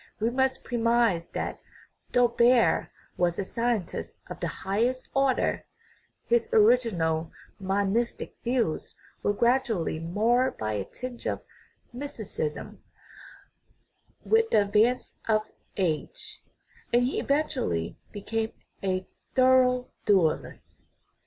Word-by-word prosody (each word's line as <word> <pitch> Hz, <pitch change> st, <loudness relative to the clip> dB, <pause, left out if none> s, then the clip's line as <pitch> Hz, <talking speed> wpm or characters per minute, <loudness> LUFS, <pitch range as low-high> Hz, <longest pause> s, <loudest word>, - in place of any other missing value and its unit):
We 225 Hz, +2 st, +1 dB
must 265 Hz, +1 st, 0 dB
premise 230 Hz, -7 st, +1 dB
that, -, -, -4 dB, 0.5 s
though 245 Hz, -1 st, +4 dB
Baer 235 Hz, 0 st, +3 dB, 0.3 s
was 175 Hz, -1 st, +1 dB
a -, -, -1 dB
scientist 230 Hz, -2 st, -2 dB
of -, -, -7 dB
the -, -, -1 dB
highest 235 Hz, +7 st, -1 dB
order, 275 Hz, -1 st, +1 dB, 0.6 s
his 470 Hz, -1 st, +2 dB
original 190 Hz, -, +3 dB, 0.3 s
monis 200 Hz, +4 st, 0 dB
tic -, -, -7 dB
views 235 Hz, -9 st, -1 dB, 0.3 s
were -, -, +2 dB
gradually 235 Hz, -7 st, +1 dB
marred 225 Hz, +10 st, +1 dB
by 110 Hz, 0 st, -2 dB
a 100 Hz, -2 st, -2 dB
tinge 250 Hz, -1 st, -7 dB
of -, -, -2 dB, 0.5 s
mysti 270 Hz, -4 st, -6 dB
cism 150 Hz, -5 st, -4 dB, 1.5 s
with 450 Hz, 0 st, +3 dB
the 210 Hz, -, +4 dB
advance 215 Hz, +5 st, +2 dB
of 215 Hz, -1 st, +3 dB, 0.3 s
age, 165 Hz, -6 st, -3 dB, 0.5 s
and 240 Hz, +1 st, +4 dB
he 255 Hz, -, 0 dB
eventually 275 Hz, -, -1 dB, 0.2 s
be 205 Hz, -, -8 dB
came 225 Hz, +1 st, -2 dB, 0.3 s
a 185 Hz, -1 st, -1 dB, 0.3 s
thorough 255 Hz, -1 st, +4 dB, 0.2 s
dualist. 185 Hz, -7 st, 0 dB
230 Hz, 115 wpm, -27 LUFS, 190-255 Hz, 1.5 s, though